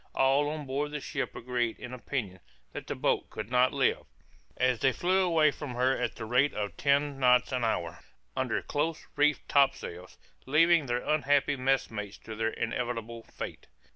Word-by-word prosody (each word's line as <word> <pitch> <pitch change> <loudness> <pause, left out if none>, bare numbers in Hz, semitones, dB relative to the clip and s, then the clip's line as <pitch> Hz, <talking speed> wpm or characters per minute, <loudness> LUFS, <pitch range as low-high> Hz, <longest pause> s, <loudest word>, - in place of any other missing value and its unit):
All 135 +2 +3
on 150 -1 -5
board 140 +2 -2
the 150 0 -4
ship - - -4
agreed 120 -1 -2
in 125 0 -8
opinion 120 -7 -4 0.3
that - - -7
the - - -3
boat - - 0
could 110 +2 -7
not 125 0 +4
live, 135 -2 +1 0.5
as 125 -2 +2
they 135 - +3
flew 185 +7 +1
away 165 -4 +4
from 140 -4 -7
her 130 +2 +2
at - - -2
the 115 - -6
rate 125 +6 +2
of 105 -1 -3
ten 140 0 +1
knots 125 0 +4
an 125 -2 -1
hour, 85 -7 -1 0.4
under - - -1
close 155 +2 -2
reefed 150 0 +2
topsails, 135 -11 0 0.3
leaving 165 +1 +4
their 120 0 -2
unhappy 145 -2 +2
messmates 125 -6 -1
to 110 - -9
their 110 +1 0
inevitable 115 0 -3
fate. - - -8
130 Hz, 170 wpm, -29 LUFS, 120-145 Hz, 0.5 s, not